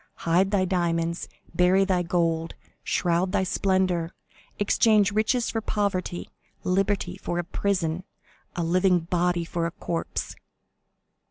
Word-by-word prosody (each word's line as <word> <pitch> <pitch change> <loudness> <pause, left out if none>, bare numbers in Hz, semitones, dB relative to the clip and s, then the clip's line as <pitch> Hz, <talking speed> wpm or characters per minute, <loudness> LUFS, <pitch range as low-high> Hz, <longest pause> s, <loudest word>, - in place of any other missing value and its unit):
Hide 175 +4 +3
thy 195 -2 +2
diamonds, 170 -2 -1 0.3
bury 180 +3 +4
thy 185 -2 +1
gold, 165 -2 0 0.3
shroud 180 +2 0
thy 190 - +2
splendor, 185 -3 +1 0.5
exchange 205 0 +3
riches 220 +3 +1
for 225 - -2
poverty, 200 -5 -2 0.3
liberty 190 -1 0
for 175 -2 -3
a 175 - 0
prison, 180 -2 -1 0.5
a 175 - -1
living 180 +1 +3
body 175 0 0
for 165 0 -2
a - - -5
corpse!" 165 +1 -4
180 Hz, 120 wpm, -26 LUFS, 170-195 Hz, 0.5 s, bury